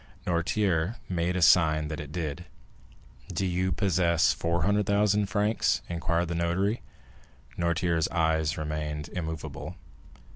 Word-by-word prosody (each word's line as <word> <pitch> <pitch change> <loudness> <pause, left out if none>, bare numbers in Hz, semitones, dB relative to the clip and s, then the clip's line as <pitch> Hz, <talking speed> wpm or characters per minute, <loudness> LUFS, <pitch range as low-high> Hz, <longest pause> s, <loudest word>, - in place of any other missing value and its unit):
Noirtier 90 +2 0
made 90 0 -1
a 90 - +1
sign 80 -4 +5
that 75 - -4
it 75 -1 -7
did. 80 0 -4 0.9
"Do 90 +2 -1
you 90 +1 0
possess 85 -2 +2
400,000 100 +4 +1
francs?" 105 +3 +1
inquired 85 0 0
the - - -1
notary. 85 +6 0 0.7
Noirtier's 85 -1 +1
eye 80 -2 +1
remained 75 -1 -4
immovable. 80 -3 -5
85 Hz, 110 wpm, -28 LUFS, 80-95 Hz, 0.9 s, sign